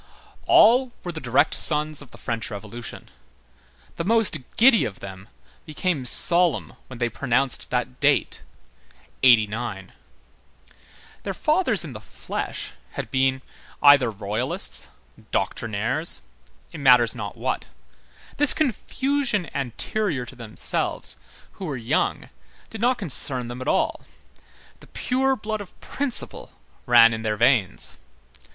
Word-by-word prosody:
All 245 +3 +5
were 175 - -4
the 160 -2 -7
direct 125 0 +2
sons 150 -1 +4
of 140 - -13
the - - -15
French 115 -1 -4
Revolution. 110 +3 -9 0.9
The - - -2
most 220 -4 +2 0.2
giddy 235 -1 +6
of 100 - -5
them 95 0 -10 0.4
became 155 -2 -2
solemn 170 +5 +4
when 130 - -10
they 120 0 0
pronounced 125 +3 -1
that 125 0 -3
date: 145 -1 +1 0.8
'89. 110 -5 +2 1.3
Their - - -5
fathers - - +2
in - - -8
the - - -7
flesh - - -6 0.2
had - - -6
been, 130 0 +1 0.4
either 145 -4 +7
royalists, 105 +3 0 0.4
doctrinaires, 115 - -1 0.5
it 165 - -9
matters 125 -4 +5
not 105 -6 -7
what; - - -3 0.7
this 295 0 +3
confusion 265 - -1
anterior 140 - -2
to - - -12
themselves, 115 -3 -2 0.3
who 190 - -9
were 145 -6 -4
young, 120 +6 -1 0.4
did 225 - -7
not 245 +1 +2
concern 130 - -2
them 120 +1 -7
at 130 - -6
all; - - 0 0.8
the - - -16
pure 265 +1 0
blood 215 -2 -4
of 195 - -13
principle 275 -4 -3 0.3
ran 115 -1 +7
in 110 - -4
their 110 -1 -2
veins. 115 - +1
130 Hz, 125 wpm, -23 LUFS, 115-185 Hz, 1.3 s, either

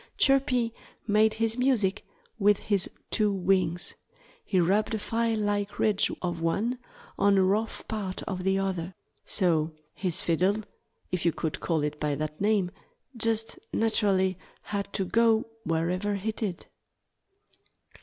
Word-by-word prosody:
Chirpy 260 -4 +3 0.3
made 215 0 +3
his 225 +1 0
music 235 -7 +2 0.4
with 205 0 +5
his 200 -3 0 0.2
two 210 -2 +2
wings. 185 -2 +1 0.5
He 190 - +1
rubbed 200 +6 +2
a - - 0
file 230 +1 0
like 205 -1 -1
ridge 210 -2 +2
of 175 -2 -2
one 220 +9 0 0.4
on 200 -1 +4
a 190 - +5
rough 210 +4 0
part 200 -4 -3
of 185 -2 -4
the 190 +1 +2
other. 190 -2 -2 0.3
So 165 -4 +1 0.2
his 180 -4 -1
fiddle 185 +6 +1 0.5
if 180 -2 -1
you 170 - +4
could 160 0 -3
call 160 -3 0
it 150 0 -3
by 150 -1 0
that 155 +2 -4
name 205 -4 +2 0.4
just 225 -1 0
naturally 195 -4 +2 0.2
had 200 -1 -3
to 190 - 0
go 225 +2 +3 0.2
wherever 180 +5 0
he 205 +3 -2
did. 205 -5 -3
200 Hz, 140 wpm, -28 LUFS, 180-220 Hz, 0.5 s, with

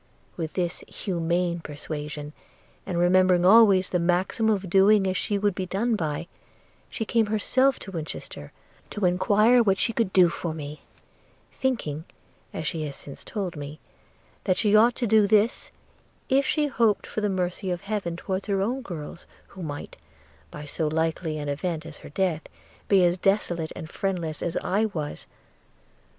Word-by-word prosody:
With 160 -3 -4
this 175 -2 -2
humane 175 -1 -1
persuasion, 150 -1 -6 0.5
and 180 -3 -2
remembering 180 0 +4
always 195 -2 +6
the 180 - 0
maxim 180 +6 +1
of 200 -3 0
doing 195 +2 +5
as 185 -1 0
she 205 +2 -1
would 205 0 +1
be 185 0 -4
done 220 +6 0
by, 155 -4 -2 0.6
she 225 - -4
came 225 -1 +2
herself 255 +5 +2
to 195 - -8
Winchester, 160 -4 -7 0.4
to 205 -3 -2
enquire 210 +7 +4
what 195 -4 +2
she 230 - +1
could 225 -4 0
do 185 -2 +6
for 170 -1 -4
me 150 -1 -7 0.4
– - - -34
thinking, 165 - -1 0.5
as 160 - -5
she 155 +1 -2
has 140 - -7
since 140 - -11
told 190 -6 -4
me, 145 +1 -7 0.7
that 185 -2 +2
she 210 -1 +3
ought 235 +3 +5
to 245 - -1
do 215 -2 +4
this, 215 +3 +2 0.6
if 270 +1 +3
she 305 -1 +1
hoped 230 -7 +1
for 215 - -4
the 210 - +1
mercy 185 +1 -2
of 175 -1 -2
Heaven 200 -5 -3
towards 190 +3 -4
her 200 -2 +1
own 240 +7 -1
girls, 170 - -8 0.2
who 190 - -11
might, 145 -3 -6 0.5
by 150 0 -8
so 155 +2 -2
likely 160 0 -1
an 145 -1 -4
event 155 +3 -3
as 160 -2 -9
her - - -11
death, 170 0 0 0.5
be 190 -3 +5
as 175 +1 +1
desolate 175 -5 0
and 160 - -7
friendless 170 -3 -3
as 170 - -2
I 205 +4 +1
was. 155 -8 -5
185 Hz, 170 wpm, -26 LUFS, 165-210 Hz, 0.7 s, always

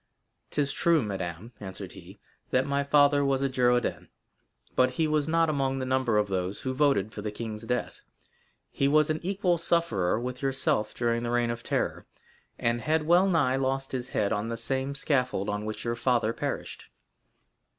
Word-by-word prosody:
"'Tis 145 -1 0
true, 165 -5 +3
madame," 95 +1 -5
answered 95 -2 -7
he, - - -13 0.3
"that 130 +1 +2
my 140 0 0
father 145 0 +4
was 135 -1 +1
a - - +3
Girondin, 125 -2 +1 0.7
but 130 0 +4
he 160 - +2
was 150 -1 +1
not 165 +1 +3
among 135 -3 0
the 130 - -2
number 130 -4 +1
of 105 0 +2
those 95 0 -2
who 130 - -2
voted 130 -7 +2
for 105 - -6
the 105 - -3
king's 110 +1 -6
death; 125 +1 -3 0.7
he 140 - +1
was 155 +1 +4
an 155 - -1
equal 185 -2 0
sufferer 115 - +1
with 125 +1 -5
yourself 135 -5 0
during 115 -1 0
the 120 - -3
Reign 120 0 +1
of 115 0 -5
Terror, - - -2 0.5
and 120 0 0
had 155 +2 +1
well 175 +4 +5
nigh 135 -7 +2
lost 135 0 -1
his 125 -1 -4
head 100 -4 0
on 105 +2 -2
the 115 - -3
same 135 +4 -1
scaffold 125 -8 0
on 105 0 -2
which 110 +2 -5
your 115 - 0
father 115 -2 +1
perished." - - -5
130 Hz, 180 wpm, -28 LUFS, 115-145 Hz, 0.7 s, well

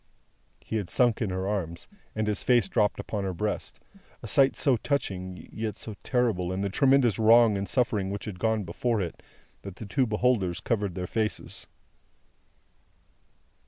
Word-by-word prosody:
He 110 - -3
had 100 -4 -4
sunk 120 -2 +2
in 110 - 0
her 95 +1 -2
arms, 90 -5 -3 0.3
and 110 0 0
his 105 -2 -1
face 120 -5 +3
dropped 105 0 +1
on 105 -2 0
her 95 -2 -3
breast: 105 +4 -3 0.4
a - - -5
sight 135 -2 +4
so 135 -3 +3
touching, 95 - -3
yet 110 -1 -4
so 110 - -7
terrible 115 -9 0
in 95 +1 -2
the 100 -1 -1
tremendous 135 -3 +3
wrong 115 0 +6
and 100 0 -3
suffering 110 -6 +1
which 100 +1 -5
had 95 -4 -7
gone 110 -1 +1
before 110 +6 -1
it, 90 -4 -4 0.4
that 100 -2 -8
the 110 - -8
two 125 +5 +1
beholders 105 -5 +1
covered 100 -3 -1
their 90 - -3
faces. 110 +3 -3
105 Hz, 165 wpm, -27 LUFS, 95-115 Hz, 0.4 s, wrong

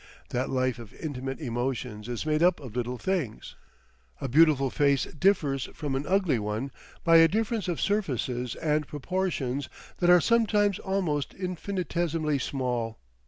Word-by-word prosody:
That 125 +2 -1
life 130 -2 0
of 115 -3 -11
intimate 135 -4 -5
emotions 120 -4 -3
is 120 +4 -3
made 155 0 +1
up 175 0 +4
of 125 -6 -10
little 125 0 -2
things. 165 - -2 0.7
A - - -3
beautiful 140 -1 +4
face 140 -2 +3
differs 150 -6 +1
from 145 -3 -3
an 135 +2 -2
ugly 185 - +2
one 105 +6 -3 0.3
by 165 -1 +7
a 165 0 +8
difference 220 +2 -1
of 175 -3 -1
surfaces 130 - -1
and 150 -1 0
proportions 145 -5 -2 0.3
that 175 - +3
are 180 0 +8
sometimes 210 -2 +2
almost 180 -8 -1
infinitesimally 175 -5 -1
small. 125 -5 -2
145 Hz, 145 wpm, -28 LUFS, 125-180 Hz, 0.7 s, a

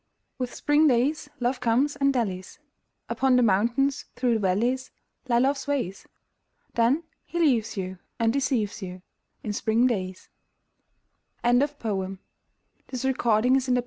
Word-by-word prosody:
With 250 -1 -2
spring 295 +2 +3
days 280 +4 +1
Love 245 +1 0
comes 250 +4 +2
and 275 0 +2
dallies: 195 -8 -3 0.5
Upon 265 -1 +2
the 250 - +4
mountains, 235 +7 +2
through 245 -1 +1
the 225 - +1
valleys 235 +7 0 0.4
Lie 235 - +4
Love's 270 +2 +1
ways. 250 -10 -2 0.7
Then 240 +8 +2 0.2
he 345 - -6
leaves 235 -10 +2
you 185 -1 -4 0.2
and 225 0 +2
deceives 260 -7 0
you 180 -1 -7 0.4
In 210 - -3
spring 225 +4 +2
days. 185 -6 -2 1.2
Ernest 275 +5 +3
Dowson 195 -5 -3 0.7
The 255 0 -4
Moon 265 - +2
Maiden's 245 +4 +3
Song - - -5
SLEEP! - - +3
245 Hz, 145 wpm, -26 LUFS, 215-270 Hz, 1.2 s, the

